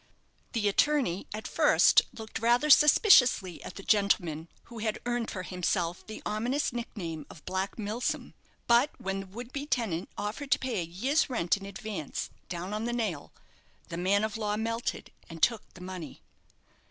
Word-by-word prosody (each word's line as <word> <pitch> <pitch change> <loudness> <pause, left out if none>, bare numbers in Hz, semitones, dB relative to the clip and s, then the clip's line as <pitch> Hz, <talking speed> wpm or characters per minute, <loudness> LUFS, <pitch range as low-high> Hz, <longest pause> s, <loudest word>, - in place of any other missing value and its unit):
The 220 -4 +1
attorney 205 - +2
at 215 +1 -5
first - - +5
looked 220 -3 -7
rather 240 +6 +3
suspiciously 255 - +6
at - - -8
the 195 - -8
gentleman 175 -7 +1 0.2
who 235 -1 -10
had 215 -1 -1
earned 240 -1 -1
for 185 - -5
himself 180 -1 -1
the 215 - -8
ominous 245 +7 -1
nickname 170 -10 -5
of 155 - -14
Black 190 +1 -2
Milsom; 220 +3 -3 0.3
but 240 +5 +5
when 195 0 -2
the 195 - -6
would 235 +6 -9
be 285 +1 -4
tenant 215 - -1
offered 210 +7 -4
to - - +4
pay 250 -6 -2
a - - -1
year's 260 - 0
rent 200 -9 +1
in 195 -1 -8
advance 200 -5 -5 0.2
down 180 +3 -4
on 215 +2 -2
the 240 - -1
nail, 210 -11 -2 0.6
the 170 - -5
man 195 +4 +2
of 220 0 -2
law 210 -1 -1
melted, 230 +2 -3 0.2
and 165 -1 -9
took 230 -3 +2
the 180 - -12
money. 180 -4 -8
210 Hz, 170 wpm, -29 LUFS, 185-240 Hz, 0.6 s, suspiciously